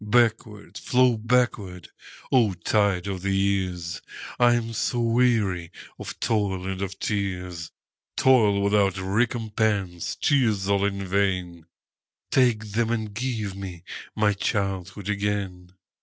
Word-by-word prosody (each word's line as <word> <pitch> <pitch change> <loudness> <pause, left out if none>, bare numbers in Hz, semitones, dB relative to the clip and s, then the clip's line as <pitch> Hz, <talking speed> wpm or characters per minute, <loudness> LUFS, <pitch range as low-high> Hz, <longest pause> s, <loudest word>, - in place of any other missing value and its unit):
Backward, 105 -4 0
flow 125 -1 +3
backward, 110 -6 0 0.4
O 115 -7 +3
tide 100 +1 +1
of 95 -2 -4
the 100 0 0
years!I 95 +4 0
am 115 -1 -2
so 120 +2 -1
weary 115 -7 +1 0.3
of - - -7
toil 100 -4 0
and 95 0 -4
of 95 0 -4
tears,—Toil 100 - 0
without 100 -2 +2
recompense, 105 -2 -1
tears 110 -9 +1
all 100 0 +2
in 100 -1 -2
vain,—Take 95 +5 -2
them, 115 +2 0
and 110 -3 -2
give 110 -4 -3
me 95 -3 -8 0.3
my 105 -1 +3
childhood 95 -1 -2
again! 100 -3 -2
100 Hz, 110 wpm, -25 LUFS, 95-110 Hz, 0.4 s, flow